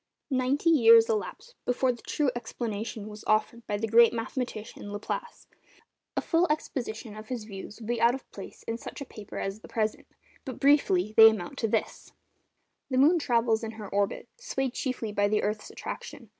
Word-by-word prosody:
Ninety 265 Hz, +5 st, +2 dB
years 230 Hz, -6 st, +7 dB
elapsed 365 Hz, -, -3 dB
before 250 Hz, +1 st, +1 dB
the 240 Hz, -, -9 dB
true 290 Hz, -4 st, 0 dB
explanation 225 Hz, -2 st, -4 dB
was 210 Hz, 0 st, -10 dB
offered 220 Hz, +2 st, 0 dB
by 205 Hz, -, -1 dB
the 225 Hz, +2 st, -2 dB
great 230 Hz, +1 st, +6 dB
mathematician 225 Hz, -3 st, -5 dB
Laplace. 475 Hz, -, -5 dB, 0.7 s
A -, -, +2 dB
full 340 Hz, +1 st, +2 dB
exposition 235 Hz, -7 st, -4 dB
of 215 Hz, 0 st, -9 dB
his 245 Hz, -3 st, -4 dB
views 205 Hz, 0 st, -9 dB
would 225 Hz, -, -9 dB
be 240 Hz, -1 st, -1 dB
out 235 Hz, +2 st, +5 dB
of 265 Hz, -, -11 dB
place 195 Hz, -, -10 dB
in 230 Hz, +1 st, -4 dB
such -, -, -8 dB
a -, -, -4 dB
paper 215 Hz, -5 st, -10 dB
as 195 Hz, +2 st, -3 dB
the -, -, -13 dB
present, 215 Hz, -1 st, -2 dB, 0.4 s
but, 260 Hz, -5 st, -7 dB
briefly, 215 Hz, -9 st, +3 dB
they 225 Hz, 0 st, +11 dB
amount 220 Hz, +4 st, -5 dB
to 225 Hz, -, +1 dB
this:— 220 Hz, 0 st, -2 dB, 0.8 s
The 260 Hz, -, 0 dB
moon 310 Hz, +6 st, +5 dB
travels 230 Hz, -5 st, +1 dB
in 225 Hz, 0 st, -4 dB
her 215 Hz, -2 st, -8 dB
orbit, 200 Hz, 0 st, -1 dB
swayed 270 Hz, -, -2 dB
chiefly 255 Hz, -6 st, -3 dB
by 205 Hz, 0 st, +2 dB
the 210 Hz, +1 st, +1 dB
earth's 210 Hz, +1 st, -2 dB
attraction. -, -, -8 dB
230 Hz, 185 wpm, -28 LUFS, 215-260 Hz, 0.8 s, they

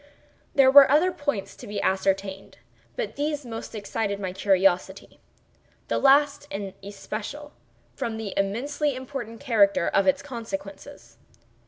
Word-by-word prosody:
There 270 Hz, -2 st, +6 dB
were 280 Hz, 0 st, +9 dB
other 315 Hz, +6 st, +4 dB
points 285 Hz, -, -3 dB
to -, -, -11 dB
be 205 Hz, 0 st, -4 dB
ascertained, 195 Hz, 0 st, -1 dB, 0.4 s
but 215 Hz, -, -4 dB
these 295 Hz, -1 st, -2 dB
most 225 Hz, -1 st, -7 dB
excited 200 Hz, -1 st, -3 dB
my 190 Hz, -2 st, -4 dB
curiosity—the 190 Hz, 0 st, -2 dB
last 285 Hz, +1 st, +4 dB
in 195 Hz, -5 st, -5 dB
especial, 215 Hz, +8 st, -7 dB, 0.4 s
from 225 Hz, -1 st, -4 dB
the 220 Hz, -3 st, -5 dB
immensely 265 Hz, +9 st, -1 dB
important 255 Hz, -3 st, -7 dB
character 205 Hz, -9 st, +3 dB
of 195 Hz, -1 st, +2 dB
its 185 Hz, -, +2 dB
consequences. 265 Hz, +1 st, -8 dB
225 Hz, 125 wpm, -25 LUFS, 195-285 Hz, 0.4 s, were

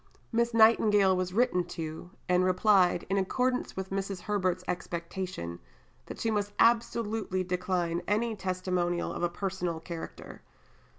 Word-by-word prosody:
Miss 235 Hz, 0 st, +1 dB
Nightingale 215 Hz, -4 st, +5 dB
was 185 Hz, 0 st, -1 dB
written 210 Hz, -3 st, +2 dB
to, 160 Hz, +1 st, -5 dB, 0.2 s
and 180 Hz, 0 st, +3 dB
replied, 185 Hz, -1 st, +3 dB
in 195 Hz, +1 st, +1 dB
accordance 250 Hz, +6 st, 0 dB
with 190 Hz, 0 st, -4 dB
Mrs. 195 Hz, -1 st, -3 dB
Herbert's 185 Hz, -3 st, -1 dB
expectation, 170 Hz, -, -4 dB, 0.5 s
that -, -, -8 dB
she 225 Hz, -, 0 dB
must 205 Hz, -1 st, -1 dB
absolutely 225 Hz, -4 st, +2 dB
decline 180 Hz, -2 st, -1 dB
any 220 Hz, +2 st, +1 dB
testimonial 185 Hz, -2 st, -1 dB
of -, -, -5 dB
a 175 Hz, -, +1 dB
personal 180 Hz, -2 st, -3 dB
character. 165 Hz, 0 st, -8 dB
185 Hz, 130 wpm, -29 LUFS, 180-210 Hz, 0.5 s, Nightingale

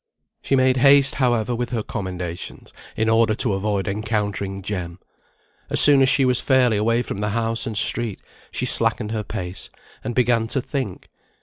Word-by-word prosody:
She 135 Hz, -, 0 dB
made 130 Hz, 0 st, +3 dB
haste, 140 Hz, +1 st, +6 dB
however, 120 Hz, -2 st, +1 dB
with 120 Hz, 0 st, -3 dB
her 115 Hz, -3 st, -2 dB
commendations, 90 Hz, -4 st, -6 dB, 0.2 s
in 110 Hz, -, 0 dB
order 115 Hz, -1 st, +3 dB
to 115 Hz, -2 st, -1 dB
avoid 100 Hz, 0 st, -2 dB
encountering 100 Hz, -2 st, -3 dB
Jem. 90 Hz, -4 st, -5 dB, 0.7 s
As -, -, +1 dB
soon 145 Hz, -2 st, +5 dB
as 130 Hz, -, +5 dB
she 135 Hz, -, +4 dB
was 125 Hz, -1 st, +2 dB
fairly 130 Hz, -4 st, +3 dB
away 115 Hz, +3 st, +1 dB
from 100 Hz, -, -6 dB
the 105 Hz, 0 st, -1 dB
house 115 Hz, +1 st, -1 dB
and 110 Hz, -2 st, -3 dB
street, 115 Hz, -1 st, +1 dB, 0.3 s
she -, -, -3 dB
slackened 105 Hz, -, +1 dB
her 110 Hz, -1 st, -2 dB
pace, 95 Hz, -4 st, -5 dB, 0.3 s
and 120 Hz, -, -4 dB
began 120 Hz, -2 st, +2 dB
to 135 Hz, -, 0 dB
think. 130 Hz, -6 st, -5 dB
115 Hz, 175 wpm, -22 LUFS, 100-125 Hz, 0.7 s, haste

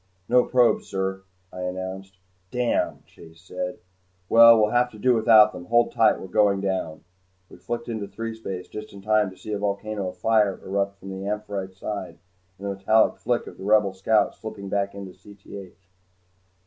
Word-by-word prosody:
"No 125 Hz, 0 st, +4 dB
probes, 125 Hz, -2 st, +2 dB
sir," 95 Hz, 0 st, -3 dB, 0.3 s
I 90 Hz, -, -7 dB
announced. 95 Hz, +1 st, -6 dB, 0.3 s
"Damn," 125 Hz, +1 st, -1 dB
Chase 80 Hz, 0 st, -17 dB
said. 90 Hz, 0 st, -5 dB, 0.5 s
"Well, 115 Hz, 0 st, +8 dB
we'll 105 Hz, 0 st, +2 dB
have 125 Hz, 0 st, +2 dB
to -, -, -11 dB
do 125 Hz, +4 st, +3 dB
without 110 Hz, -2 st, +6 dB
them. 90 Hz, -, -9 dB
Hold 120 Hz, +2 st, +2 dB
tight, 110 Hz, -1 st, +3 dB
we're -, -, -8 dB
going 100 Hz, +1 st, +2 dB
down." 95 Hz, -5 st, -3 dB, 0.5 s
We -, -, -13 dB
flicked 120 Hz, +6 st, -5 dB
into 110 Hz, -4 st, -4 dB
threespace 110 Hz, -4 st, -6 dB
just 105 Hz, 0 st, -9 dB
in 100 Hz, -1 st, -12 dB
time 105 Hz, -1 st, +2 dB
to 95 Hz, -, -15 dB
see 110 Hz, -, -8 dB
a 105 Hz, -, -2 dB
volcano 100 Hz, -1 st, -3 dB
of -, -, -12 dB
fire 105 Hz, -3 st, +2 dB
erupt 100 Hz, +1 st, -2 dB
from 95 Hz, 0 st, -9 dB
"Amphitrite's" 100 Hz, -2 st, -4 dB
side 100 Hz, -2 st, -6 dB, 0.4 s
and 100 Hz, -, -9 dB
the 100 Hz, -, -2 dB
metallic 110 Hz, +3 st, +2 dB
flick 120 Hz, 0 st, -1 dB
of -, -, -12 dB
the -, -, -8 dB
Rebel 105 Hz, -1 st, +3 dB
scout 105 Hz, +3 st, +1 dB
slipping 105 Hz, -3 st, -8 dB
back 100 Hz, 0 st, -1 dB
into 100 Hz, -2 st, -8 dB
Cth. 95 Hz, 0 st, -12 dB
100 Hz, 175 wpm, -24 LUFS, 95-110 Hz, 0.5 s, Well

